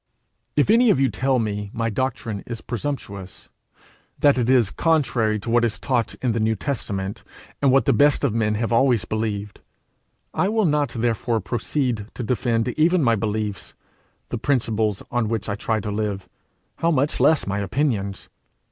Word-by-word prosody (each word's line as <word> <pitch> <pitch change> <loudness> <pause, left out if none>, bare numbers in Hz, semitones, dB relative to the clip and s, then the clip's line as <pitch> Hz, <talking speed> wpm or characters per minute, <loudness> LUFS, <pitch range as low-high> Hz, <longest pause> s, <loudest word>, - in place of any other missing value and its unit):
If 150 +7 +3
any 235 +1 +5
of 145 - +4
you 135 -1 +3
tell 130 0 +1
me 105 -3 -2
my 115 0 -1
doctrine 115 -3 -2
is 115 -2 -5
presumptuous, 110 -8 -6 0.7
that 145 -1 +4
it 125 -1 0
is 125 -6 +4
contrary 125 -9 +1
to 115 - -6
what 120 0 +4
is 115 -2 0
taught 125 -4 -1
in 125 - +2
the 115 - -1
New 110 +1 +1
Testament, 100 -7 -4 0.4
and 140 -2 +4
what 135 +1 +4
the - - +4
best 145 0 +3
of 135 -6 +2
men 110 -2 +1
have 115 +2 -1
always 120 -3 +3
believed, 105 -2 -3 0.7
I 190 - +1
will 220 -1 +2
not 150 -4 +2
therefore 115 0 0
proceed 115 +2 -2
to 125 - -4
defend 120 0 0
even 160 +5 +2
my 115 -2 +4
beliefs, 105 -1 -3 0.5
the 120 - -3
principles 110 -6 0
on 120 -2 0
which 110 -1 -2
I 100 - -1
try 110 +2 -1
to 105 - -4
live 105 -2 -3 0.5
how 165 - +1
much 145 -2 +1
less 160 -2 +4
my 100 0 -2
opinions! 100 -2 -1
115 Hz, 175 wpm, -23 LUFS, 105-135 Hz, 0.7 s, any